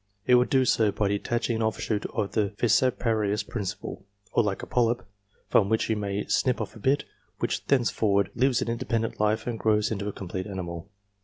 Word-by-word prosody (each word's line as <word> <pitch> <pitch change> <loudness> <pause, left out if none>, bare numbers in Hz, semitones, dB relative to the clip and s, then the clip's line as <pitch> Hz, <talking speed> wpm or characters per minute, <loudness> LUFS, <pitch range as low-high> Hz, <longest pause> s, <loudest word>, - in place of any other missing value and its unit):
It 125 - +4
would 125 0 +5
do 130 -1 +3
so 110 -3 +3
by 100 0 0
detaching 115 +3 -1
an - - -2
offshoot 110 -1 -1
on 100 - -2
the 105 0 0
fissiparous 110 -3 +2
principle, 100 -3 -5 0.3
or - - +4
like 105 -3 -2
a - - -3
polyp, 120 0 +1 0.4
from 100 -2 +3
which 110 0 +1
you - - +2
may 100 -1 -2
snip 130 -2 +1
off - - -5
a - - -11
bit, 135 +6 +2 0.3
which - - -2
thenceforward 110 -7 +2
lives 125 0 +2
an - - -7
independent 115 -1 -2
life 105 +1 +1
and 120 -2 -3
grows 105 0 +2
into 100 -1 -2
a - - -1
complete 95 0 -5
animal. 90 -2 -6
110 Hz, 190 wpm, -27 LUFS, 100-120 Hz, 0.4 s, would